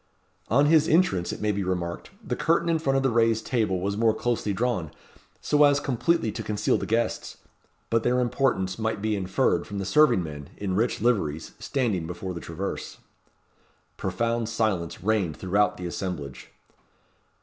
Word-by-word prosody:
On 140 Hz, +6 st, +4 dB
his 155 Hz, 0 st, +5 dB
entrance, 160 Hz, -, +2 dB
it -, -, -7 dB
may 105 Hz, 0 st, +1 dB
be 100 Hz, 0 st, -2 dB
remarked, 90 Hz, -2 st, -3 dB, 0.2 s
the -, -, -1 dB
curtain 170 Hz, +1 st, +1 dB
in 165 Hz, -1 st, +2 dB
front 135 Hz, -3 st, +1 dB
of 135 Hz, -, +1 dB
the 135 Hz, -, +2 dB
raised 115 Hz, -1 st, +2 dB
table 110 Hz, -7 st, 0 dB
was 100 Hz, +2 st, -2 dB
more 110 Hz, 0 st, +2 dB
closely 115 Hz, -3 st, -1 dB
drawn, 100 Hz, -6 st, -1 dB, 0.5 s
so 150 Hz, 0 st, +3 dB
as 145 Hz, -1 st, +5 dB
completely 140 Hz, -1 st, 0 dB
to 115 Hz, -, -5 dB
conceal 105 Hz, -1 st, 0 dB
the -, -, -4 dB
guests. 115 Hz, +1 st, -1 dB, 0.5 s
But 115 Hz, 0 st, +3 dB
their 125 Hz, +2 st, +1 dB
importance 120 Hz, -6 st, 0 dB
might 110 Hz, -1 st, -1 dB
be 110 Hz, +1 st, 0 dB
inferred 95 Hz, -2 st, 0 dB
from 100 Hz, -, -6 dB
the 100 Hz, -, -3 dB
serving 120 Hz, -1 st, +4 dB
men, 75 Hz, -3 st, -8 dB
in 100 Hz, -2 st, -3 dB
rich 115 Hz, +2 st, 0 dB
liveries, 95 Hz, -10 st, 0 dB
standing 110 Hz, -12 st, -1 dB
before 90 Hz, +2 st, -5 dB
the 85 Hz, -, -6 dB
traverse. 85 Hz, +4 st, -5 dB, 1.0 s
Profound 115 Hz, -1 st, -1 dB
silence 95 Hz, -8 st, -1 dB
reigned 95 Hz, -7 st, 0 dB
throughout 100 Hz, +1 st, +1 dB
the 90 Hz, -, -6 dB
assemblage. 85 Hz, -7 st, -5 dB
110 Hz, 170 wpm, -26 LUFS, 95-120 Hz, 1.0 s, his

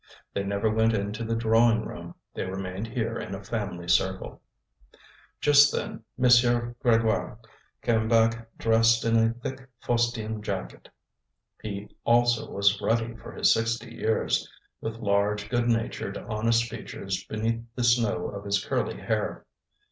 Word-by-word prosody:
They 100 Hz, -, -1 dB
never 100 Hz, +2 st, -1 dB
went 110 Hz, +1 st, +2 dB
into 105 Hz, +2 st, -3 dB
the 115 Hz, 0 st, -1 dB
drawing 115 Hz, 0 st, +3 dB
room, -, -, -8 dB, 0.2 s
they -, -, -3 dB
remained 95 Hz, +2 st, -4 dB
here 115 Hz, -1 st, -2 dB
in 95 Hz, -, -5 dB
a 95 Hz, -, -9 dB
family 100 Hz, -5 st, -4 dB
circle. 95 Hz, +2 st, 0 dB, 1.0 s
Just 145 Hz, -1 st, +6 dB
then 110 Hz, -, -4 dB
M. 130 Hz, -, -3 dB
Grégoire 120 Hz, -2 st, +3 dB, 0.5 s
came 110 Hz, -2 st, +2 dB
back 115 Hz, 0 st, +2 dB
dressed 115 Hz, 0 st, +3 dB
in 115 Hz, 0 st, +2 dB
a 115 Hz, 0 st, +4 dB
thick 130 Hz, +2 st, -7 dB
fustian 115 Hz, -3 st, -1 dB
jacket; 100 Hz, -2 st, -5 dB, 0.7 s
he 100 Hz, -1 st, -5 dB, 0.2 s
also 120 Hz, 0 st, +3 dB
was 100 Hz, 0 st, +2 dB
ruddy 115 Hz, 0 st, 0 dB
for -, -, -10 dB
his -, -, +4 dB
sixty 115 Hz, +1 st, -2 dB
years, 110 Hz, -1 st, 0 dB, 0.3 s
with 110 Hz, 0 st, -4 dB
large, 105 Hz, -1 st, 0 dB
good 120 Hz, 0 st, +1 dB
natured, 115 Hz, -1 st, -1 dB
honest 115 Hz, +2 st, +1 dB
features 95 Hz, -4 st, -5 dB
beneath 115 Hz, +1 st, -2 dB
the 125 Hz, -, -2 dB
snow 115 Hz, -6 st, +2 dB
of 100 Hz, 0 st, -7 dB
his 100 Hz, -1 st, 0 dB
curly -, -, -1 dB
hair. -, -, -2 dB
115 Hz, 140 wpm, -27 LUFS, 105-115 Hz, 1.0 s, Just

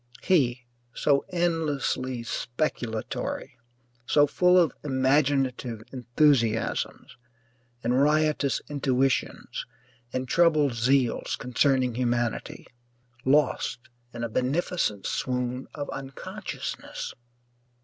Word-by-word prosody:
He, 130 Hz, -8 st, +2 dB, 0.3 s
so 140 Hz, -1 st, +2 dB
endlessly 145 Hz, -8 st, -1 dB
speculatory, 120 Hz, -3 st, -3 dB, 0.5 s
so 145 Hz, +1 st, +5 dB
full 180 Hz, +5 st, +4 dB
of 170 Hz, -7 st, +4 dB
imaginative 130 Hz, -4 st, +1 dB
enthusiasms 120 Hz, -2 st, +1 dB, 0.7 s
and 125 Hz, +3 st, +2 dB
riotous 150 Hz, -1 st, +2 dB
intuitions 135 Hz, -2 st, -1 dB, 0.4 s
and 130 Hz, +1 st, -2 dB
troubled 155 Hz, -4 st, +4 dB
zeals 120 Hz, +1 st, +1 dB
concerning 125 Hz, 0 st, +2 dB
humanity, 120 Hz, -1 st, -1 dB, 0.6 s
lost 145 Hz, +3 st, +2 dB, 0.3 s
in 120 Hz, 0 st, -6 dB
a -, -, 0 dB
beneficent 130 Hz, -, 0 dB
swoon 125 Hz, 0 st, -2 dB
of 145 Hz, -2 st, -4 dB
unconsciousness! 135 Hz, -1 st, -6 dB
130 Hz, 80 wpm, -27 LUFS, 120-150 Hz, 0.7 s, so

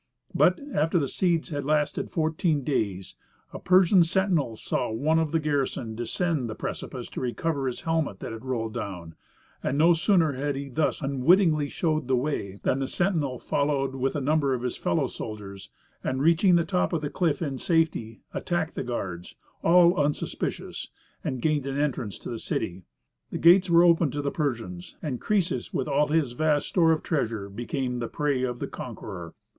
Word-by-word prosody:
But, -, -, +4 dB
after 160 Hz, +4 st, +2 dB
the 145 Hz, -5 st, +1 dB
siege 170 Hz, +2 st, 0 dB
had 145 Hz, -3 st, -3 dB
lasted 150 Hz, +1 st, 0 dB
fourteen 155 Hz, -2 st, 0 dB
days, 100 Hz, -9 st, -2 dB, 0.4 s
a -, -, -6 dB
Persian 185 Hz, 0 st, +5 dB
sentinel 170 Hz, -, +1 dB
saw 120 Hz, -, -2 dB
one 155 Hz, +9 st, +2 dB
of 160 Hz, -2 st, 0 dB
the 165 Hz, -, +2 dB
garrison 140 Hz, -6 st, -1 dB
descend 130 Hz, +3 st, -1 dB
the 110 Hz, -, -5 dB
precipice -, -, -5 dB
to -, -, -6 dB
recover 135 Hz, +3 st, -1 dB
his 125 Hz, -, -4 dB
helmet 160 Hz, -11 st, -1 dB
that -, -, -6 dB
had 115 Hz, +1 st, -8 dB
rolled 115 Hz, -4 st, -2 dB
down; 90 Hz, -4 st, -6 dB, 0.5 s
and 135 Hz, -, -1 dB
no 165 Hz, +3 st, +6 dB
sooner 165 Hz, -2 st, +3 dB
had 140 Hz, +2 st, -2 dB
he 140 Hz, 0 st, -5 dB
thus 150 Hz, +4 st, 0 dB
unwittingly 150 Hz, +3 st, +3 dB
showed 155 Hz, -5 st, -1 dB
the 130 Hz, -, +3 dB
way, 120 Hz, -7 st, -2 dB
than 130 Hz, -, +1 dB
the 135 Hz, -, -1 dB
sentinel 155 Hz, -6 st, 0 dB
followed 140 Hz, 0 st, 0 dB
with 135 Hz, +1 st, -1 dB
a 145 Hz, -, -1 dB
number 140 Hz, -1 st, +2 dB
of 125 Hz, -, -5 dB
his 125 Hz, -, -2 dB
fellow 155 Hz, -4 st, 0 dB
soldiers 105 Hz, -5 st, -7 dB, 0.3 s
and, 130 Hz, 0 st, -1 dB
reaching 170 Hz, +3 st, +5 dB
the 170 Hz, -1 st, +3 dB
top 180 Hz, 0 st, 0 dB
of 165 Hz, -, 0 dB
the 145 Hz, -, -2 dB
cliff 170 Hz, -5 st, +1 dB
in 140 Hz, -6 st, -3 dB
safety, 160 Hz, -10 st, 0 dB
attacked 170 Hz, -2 st, -1 dB
the -, -, -3 dB
guards, 90 Hz, -8 st, -5 dB, 0.3 s
all 175 Hz, +1 st, +6 dB
unsuspicious, 145 Hz, +1 st, -3 dB, 0.4 s
and 130 Hz, -2 st, -3 dB
gained 150 Hz, -3 st, +1 dB
an 135 Hz, 0 st, -2 dB
entrance 125 Hz, -8 st, -1 dB
to -, -, -10 dB
the 115 Hz, -, -4 dB
city. 90 Hz, -3 st, -3 dB, 0.4 s
The -, -, -4 dB
gates 180 Hz, +2 st, +6 dB
were 170 Hz, 0 st, +6 dB
opened 170 Hz, -5 st, +4 dB
to 145 Hz, 0 st, -2 dB
the 140 Hz, -, -1 dB
Persians, 115 Hz, -, -3 dB
and 135 Hz, -6 st, -3 dB
Croesus 185 Hz, -, -1 dB
with 130 Hz, -, -1 dB
all 150 Hz, -, +2 dB
his 150 Hz, -4 st, +1 dB
vast 150 Hz, +3 st, +1 dB
store 165 Hz, -3 st, +4 dB
of 160 Hz, -, 0 dB
treasure 115 Hz, -, -1 dB
became 125 Hz, +4 st, -3 dB
the 120 Hz, -, -2 dB
prey 145 Hz, -1 st, -1 dB
of 125 Hz, -1 st, -1 dB
the -, -, -3 dB
conqueror. -, -, -8 dB
145 Hz, 185 wpm, -26 LUFS, 125-165 Hz, 0.5 s, no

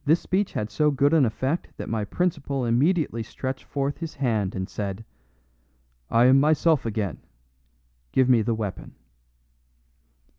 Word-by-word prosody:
This 155 Hz, +4 st, +3 dB
speech 195 Hz, +2 st, -1 dB
had 105 Hz, 0 st, -3 dB
so 150 Hz, +7 st, +2 dB
good 140 Hz, +1 st, +2 dB
an 155 Hz, -5 st, +5 dB
effect 130 Hz, +8 st, -2 dB
that -, -, -6 dB
my 110 Hz, -2 st, -2 dB
principal 140 Hz, -, -1 dB
immediately 130 Hz, +1 st, +1 dB
stretched 130 Hz, +3 st, -5 dB
forth 140 Hz, 0 st, -3 dB
his 165 Hz, -1 st, -6 dB
hand 110 Hz, -8 st, -1 dB
and 95 Hz, -1 st, -3 dB
said, 100 Hz, +1 st, -5 dB, 1.0 s
"I 115 Hz, +1 st, +4 dB
am 130 Hz, +2 st, +6 dB
myself 155 Hz, -1 st, +3 dB
again; 105 Hz, -5 st, -3 dB, 0.9 s
give 130 Hz, -, +3 dB
me 125 Hz, -3 st, +5 dB
the 115 Hz, +1 st, 0 dB
weapon." 105 Hz, -3 st, -6 dB
130 Hz, 145 wpm, -25 LUFS, 110-150 Hz, 1.0 s, am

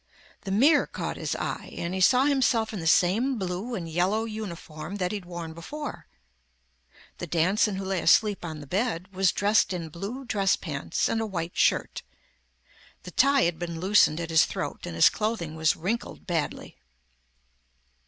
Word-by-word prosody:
The 195 Hz, -, -3 dB
mirror 285 Hz, +9 st, +4 dB
caught -, -, -4 dB
his -, -, -3 dB
eye -, -, -5 dB
and 170 Hz, +1 st, -3 dB
he 190 Hz, -, -2 dB
saw 250 Hz, +7 st, +5 dB
himself 255 Hz, -6 st, +2 dB
in 205 Hz, -, -4 dB
the 165 Hz, -, -3 dB
same 220 Hz, +11 st, +3 dB
blue 190 Hz, +5 st, -3 dB
and 175 Hz, -6 st, -5 dB
yellow 185 Hz, +7 st, 0 dB
uniform 190 Hz, -6 st, -7 dB
that 180 Hz, -3 st, -1 dB
he'd 205 Hz, -4 st, -5 dB
worn 170 Hz, -2 st, -7 dB
before. 290 Hz, -, -7 dB, 1.1 s
The 175 Hz, -, -5 dB
Danson 185 Hz, +6 st, +2 dB
who 190 Hz, 0 st, -4 dB
lay 190 Hz, -2 st, -1 dB
asleep 205 Hz, +3 st, +3 dB
on 160 Hz, -3 st, -6 dB
the -, -, -9 dB
bed 190 Hz, -, -2 dB
was 190 Hz, -1 st, +3 dB
dressed 205 Hz, -1 st, +2 dB
in 170 Hz, -3 st, -4 dB
blue 205 Hz, -, -6 dB
dress 200 Hz, -5 st, +2 dB
pants -, -, -2 dB
and 225 Hz, -, 0 dB
a 220 Hz, -, -2 dB
white 175 Hz, -4 st, -4 dB
shirt. -, -, +1 dB, 1.0 s
The 180 Hz, -, -9 dB
tie 275 Hz, +6 st, +4 dB
had 170 Hz, -1 st, 0 dB
been 170 Hz, -2 st, -4 dB
loosened 185 Hz, -4 st, +4 dB
at 165 Hz, -1 st, -4 dB
his 160 Hz, -1 st, +5 dB
throat -, -, -5 dB
and 85 Hz, -, -6 dB
his 85 Hz, -, +7 dB
clothing 210 Hz, -8 st, -2 dB
was 160 Hz, -1 st, +2 dB
wrinkled 215 Hz, +8 st, -4 dB
badly. 170 Hz, -5 st, -3 dB
190 Hz, 175 wpm, -26 LUFS, 170-220 Hz, 1.1 s, his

